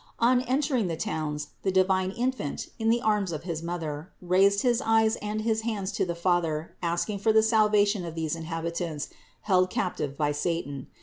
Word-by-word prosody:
On 245 +2 +4
entering 260 -3 +1
the 165 -2 -3
towns 150 -2 -3
the 195 - 0
divine 185 0 +2
Infant, 235 - -3
in 225 0 +1
the 235 +1 +3
arms 210 -5 +1
of 155 -1 -5
his 165 -3 -4
Mother, 165 -2 -4
raised 195 +3 +3
his 245 -1 +2
eyes 225 -2 +3
and 210 +1 -3
his 220 0 0
hands 210 -4 -2
to 205 - 0
the 170 - -2
Father 170 -3 0
asking 175 +4 -1
for 220 +3 +3
the 220 0 +5
salvation 210 -3 +3
of 165 -1 -6
these 160 -1 -1
inhabitants 165 -1 -4 0.3
held 185 -2 +3
captive 150 -7 -2
by 150 -1 +1
satan. 145 -3 -3
185 Hz, 180 wpm, -27 LUFS, 165-220 Hz, 0.3 s, the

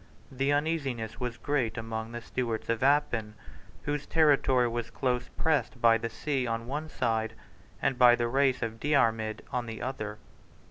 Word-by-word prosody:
The 135 +2 0
uneasiness 145 -7 -1
was 125 -2 -3
great 130 -3 -1
among 110 0 -4
the 120 0 -6
Stewarts 115 -4 -3
of 115 -1 0
Appin, 125 -6 +2 0.5
whose 145 -1 -2
territory 140 -5 +4
was 120 0 -3
close 125 -2 -1
pressed 155 -5 0
by 115 -1 +5
the 115 - -3
sea 130 +2 -2
on 115 0 -2
one 150 +5 -4
side, 115 -4 -1 0.5
and 135 -2 +1
by 120 -1 +8
the 120 -1 0
race 130 0 +2
of 115 0 -4
Diarmid 115 -7 +1
on 125 -2 -2
the 110 -1 -6
other. 110 -4 -4
125 Hz, 165 wpm, -29 LUFS, 115-140 Hz, 0.5 s, by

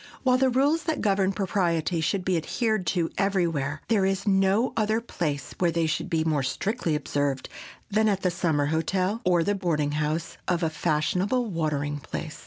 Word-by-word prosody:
While 255 -1 +3
the 265 0 +4
rules 285 +6 +2
that 320 -2 -1
govern 195 -2 +2
propriety 180 -4 0
should 185 +3 -1
be 185 - +2
adhered 215 +4 -1
to 170 -3 0
everywhere, 165 -7 0
there 215 -4 +2
is 195 +2 0
no 195 +4 +3
other 220 0 +1
place 155 - -3
where 175 - +3
they 170 0 +1
should 160 - -2
be 160 -1 +1
more 155 -3 +1
strictly 175 - -1
observed 145 -2 -1 0.4
than 215 +1 +3
at 195 -2 0
the 180 - +2
summer 160 -4 +1
hotel, 185 +6 0
or 175 -2 +3
the 205 - +1
boarding 165 -7 0
house 150 +2 -2
of 175 -1 +1
a 160 - +1
fashionable 175 +10 0
watering 145 -3 -1
place. 155 +2 -6
180 Hz, 180 wpm, -26 LUFS, 155-200 Hz, 0.4 s, the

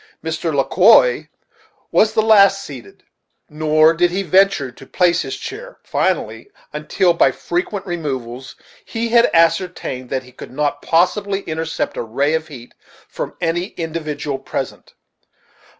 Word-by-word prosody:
Mr. 160 +1 -2
Le 140 -2 +1
Quoi 225 - +5 0.6
was 215 0 +3
the 220 - +3
last 200 -2 +5
seated, 120 -9 -11 0.5
nor 155 +1 +3
did 175 +1 +2
he 190 +3 -2
venture 185 -6 +2
to 135 +2 -15
place 180 -1 +2
his - - -5
chair - - -8
finally, - - -2 0.2
until 170 +4 +1
by 170 - +3
frequent 185 +3 -3
removals 135 -8 -5 0.3
he 230 +1 -3
had 235 0 +5
ascertained 165 -6 0
that 130 -1 -2
he 125 - -16
could 125 - -11
not 145 +1 -2
possibly 195 +4 +1
intercept 160 -2 -4
a - - -1
ray 135 +6 -1
of 160 -1 -1
heat 125 -6 -12 0.3
front - - -6
any 175 +1 -1
individual 155 -4 -4
present. - - -6
165 Hz, 140 wpm, -19 LUFS, 145-195 Hz, 0.6 s, Quoi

